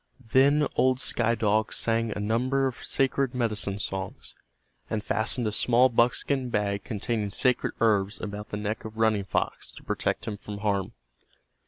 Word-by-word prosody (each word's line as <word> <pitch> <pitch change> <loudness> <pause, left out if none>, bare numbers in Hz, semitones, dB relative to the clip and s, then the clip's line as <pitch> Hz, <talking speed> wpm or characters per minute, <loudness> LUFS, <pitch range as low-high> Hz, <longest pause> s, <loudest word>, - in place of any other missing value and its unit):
Then 145 +3 +5
old 130 0 +3
Sky 115 -3 +1
Dog 110 0 +1
sang 115 0 0
a 105 - -4
number 125 +6 +1
of 130 -3 -4
sacred 135 -1 0
medicine 110 -5 0
songs, 95 -1 -5 0.6
and 105 -1 -2
fastened 110 +3 0
a 105 - 0
small 125 +4 +4
buckskin 125 +2 +1
bag 100 -3 -1
containing 105 0 -2
sacred 125 +5 0
herbs 105 -3 +2
about 105 0 -6
the 105 - -4
neck 105 +1 -3
of 110 0 -9
Running 110 -3 +2
Fox - - -2
to - - -13
protect - - -2
him 105 - -3
from 105 0 -8
harm. 100 -2 0
110 Hz, 160 wpm, -27 LUFS, 105-125 Hz, 0.6 s, Then